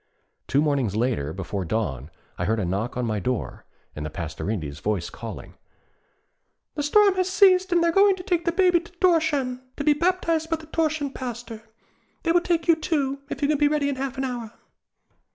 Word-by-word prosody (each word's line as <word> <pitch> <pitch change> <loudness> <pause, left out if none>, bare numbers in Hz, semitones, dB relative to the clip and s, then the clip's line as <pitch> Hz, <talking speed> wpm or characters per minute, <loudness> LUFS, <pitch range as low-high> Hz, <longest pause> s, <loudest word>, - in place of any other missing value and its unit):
Two 140 +2 +2
mornings 135 -9 0
later, 110 - 0
before 95 +2 -4
dawn, 80 - -2 0.3
I 90 - -3
heard 110 +3 +1
a 100 - -1
knock 100 +8 -2
on 125 - -1
my 110 -2 -1
door, 125 +5 -3 0.3
and 75 - -5
the 75 - -3
Pastorinde's 80 -1 -4
voice 100 -3 -2
calling, - - -8 1.2
'The 295 - -3
storm 400 +7 +5
has 370 0 0
ceased 375 -1 +5
and 345 -1 +3
they 340 - +3
are - - +2
going 395 +2 +5
to 365 - -9
take 350 -2 0
the 340 - +2
Baby 360 -1 +4
to 340 - -15
Thorshavn, 320 -8 +1 0.2
to 285 - -2
be 300 - +5
baptized 330 0 0
by 330 - +2
the 315 0 -11
Thorshavn 310 -3 -1
pastor. 235 -3 -7 0.5
They 330 - +2
will 350 +1 +4
take 340 -2 0
you, 335 - +6
too, 280 -4 -1
if - - -5
you - - +4
can 295 -1 +1
be 295 - +5
ready 290 -1 +1
in 275 - -3
half 270 0 -4
an 265 - -1
hour.' 240 -4 -4
280 Hz, 205 wpm, -24 LUFS, -, 1.2 s, you